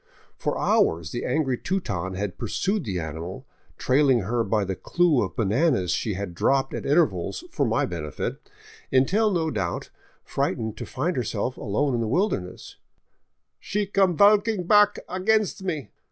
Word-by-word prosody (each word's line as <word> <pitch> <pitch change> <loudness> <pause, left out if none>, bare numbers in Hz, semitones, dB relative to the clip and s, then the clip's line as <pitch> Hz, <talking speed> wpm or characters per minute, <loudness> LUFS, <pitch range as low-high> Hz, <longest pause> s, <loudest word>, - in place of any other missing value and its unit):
For - - -2
hours 80 -1 +2
the 120 - -4
angry 130 -1 0
Teuton 95 - -2
had 95 -2 -4
pursued 190 - -1
the 95 -4 -2
animal, 80 +3 -6 0.3
trailing 130 -2 +3
her 115 +5 0
by 105 -1 0
the 95 0 -3
clue 170 - +2
of - - -3
bananas 115 - +1
she 105 -4 -1
had 100 -2 -5
dropped 135 +9 +1
at - - -4
intervals 135 - +1
for - - 0
my - - +1
benefit, 75 -5 -5 0.4
until, 185 +12 +3
no 165 -5 0
doubt 95 -7 -3 0.3
frightened 110 -1 -2
to - - -6
find 155 +7 -2
herself 125 +1 -2
alone 130 +7 -1
in 120 - 0
the 115 - -1
wilderness, 115 - -2 0.4
" - - -50 0.3
she 205 0 -2
come 195 -4 +2
valking 205 -2 +4
pack 210 0 +5
against 200 +2 +1
me. 155 - -4
130 Hz, 155 wpm, -25 LUFS, -, 0.4 s, pack